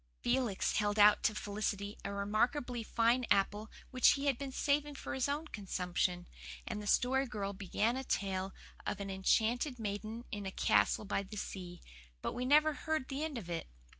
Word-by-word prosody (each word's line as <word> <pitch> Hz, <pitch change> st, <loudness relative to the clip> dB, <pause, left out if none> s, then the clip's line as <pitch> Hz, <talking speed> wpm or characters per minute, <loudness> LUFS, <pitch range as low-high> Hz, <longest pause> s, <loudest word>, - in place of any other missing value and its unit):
Felix 240 Hz, -5 st, +1 dB
held 205 Hz, 0 st, +1 dB
out 210 Hz, 0 st, +7 dB
to 215 Hz, -, +1 dB
Felicity 205 Hz, 0 st, -3 dB
a -, -, -3 dB
remarkably 235 Hz, +5 st, 0 dB
fine 230 Hz, +3 st, +2 dB
apple 205 Hz, +2 st, +2 dB, 0.2 s
which 255 Hz, -1 st, +6 dB
he 280 Hz, 0 st, -3 dB
had 280 Hz, -2 st, +3 dB
been 275 Hz, +2 st, -5 dB
saving 290 Hz, +2 st, 0 dB
for -, -, -5 dB
his 265 Hz, +1 st, 0 dB
own 300 Hz, +3 st, -2 dB
consumption; 180 Hz, -3 st, -1 dB, 0.4 s
and 210 Hz, -, -4 dB
the 205 Hz, -, -7 dB
Story 265 Hz, +4 st, +3 dB
Girl 200 Hz, -4 st, -3 dB
began 205 Hz, +4 st, 0 dB
a 265 Hz, -, -3 dB
tale 195 Hz, -5 st, -1 dB, 0.3 s
of 205 Hz, -, -3 dB
an 195 Hz, -1 st, -4 dB
enchanted 230 Hz, +7 st, +1 dB
maiden 215 Hz, +2 st, -4 dB
in 205 Hz, -2 st, -4 dB
a -, -, -3 dB
castle 105 Hz, -, +2 dB
by 200 Hz, -, 0 dB
the 200 Hz, +2 st, -9 dB
sea; 180 Hz, -3 st, -6 dB, 0.4 s
but -, -, -2 dB
we 245 Hz, +1 st, -3 dB
never 300 Hz, +3 st, +5 dB
heard 315 Hz, -3 st, -2 dB
the 275 Hz, +2 st, -2 dB
end 310 Hz, -4 st, -3 dB
of 205 Hz, -7 st, -6 dB
it. 170 Hz, -1 st, -4 dB
215 Hz, 185 wpm, -34 LUFS, 200-260 Hz, 0.4 s, out